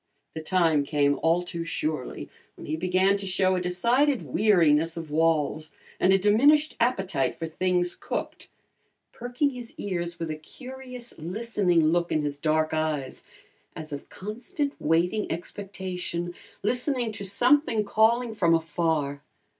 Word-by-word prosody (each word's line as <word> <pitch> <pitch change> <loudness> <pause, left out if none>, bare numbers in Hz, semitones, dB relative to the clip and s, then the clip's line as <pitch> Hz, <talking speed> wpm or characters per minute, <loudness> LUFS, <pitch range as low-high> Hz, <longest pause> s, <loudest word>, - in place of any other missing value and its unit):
The 160 - -5
time 160 -3 +2
came 145 0 +1
all 170 +2 +2
too 170 -1 -5
surely 155 -4 -3 0.3
when - - -10
he 155 - -2
began 185 +4 +2
to 200 -1 -5
show 185 0 +2
a 180 - -1
decided 235 +10 +2
weariness 165 -6 +3
of 165 -2 -6
walls 155 -1 +1 0.3
and 185 - +4
a 195 - +6
diminished 280 +10 +4
appetite 195 - 0
for 165 - -4
things 180 +2 0
cooked, - - -5 0.6
perking 245 +4 -1
his 245 -3 -9
ears 175 -3 -3
with 165 -1 -3
a - - -3
curious, 250 - -9
listening 180 -2 +1
look 170 +1 +1
in 155 - +1
his 145 -1 -2
dark 155 +1 +1
eyes, 155 -4 -2 0.5
as 155 -1 -7
of 140 - -7
constant, 245 +8 -4
waiting 175 +7 +1
expectation, 180 -1 -5 0.3
listening 250 +1 0
to 205 - -6
something 240 +3 +3
calling 225 +3 +2
from 170 -6 +3
afar. 160 -3 -1
180 Hz, 140 wpm, -26 LUFS, 160-220 Hz, 0.6 s, a